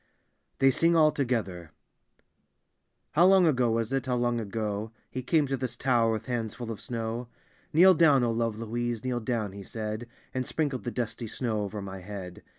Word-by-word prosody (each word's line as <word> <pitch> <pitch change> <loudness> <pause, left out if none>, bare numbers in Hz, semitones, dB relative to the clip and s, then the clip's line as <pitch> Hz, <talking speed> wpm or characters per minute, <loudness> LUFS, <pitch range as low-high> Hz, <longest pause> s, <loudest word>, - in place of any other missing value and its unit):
(they 135 0 +5
sing 165 +5 +3
all 155 -2 +6
togbthbr) 110 - -2 1.4
How 170 +4 +5
long 190 -1 +6
ago 125 -6 +3
was 115 +2 0
it, 135 -1 -1
how 125 - +1
long 120 -1 +1
ago. 105 0 -3 0.2
He 130 - -3
came 150 +4 +2
to 135 0 -1
this 125 -2 -4
tower 120 -3 +2
with 110 - -4
bands 115 -4 -3
full 120 -2 -5
of 110 - -7
snow? 115 0 -4 0.2
" - - -34
Kneel 185 +4 +7
down, 150 -6 +5
O 120 - +2
lore 115 0 +1
Louise, 115 +2 -3
kneel 125 -1 0
down," 110 -3 -2
he 100 +1 -9
said. 110 +3 -5 0.3
And 130 - -1
sprinkled 140 -2 -2
the - - 0
dusty 115 -1 -3
snow 110 -1 -2
over 100 0 -4
my 95 -1 -7
bead. 90 -2 -8
120 Hz, 190 wpm, -28 LUFS, 110-130 Hz, 1.4 s, Kneel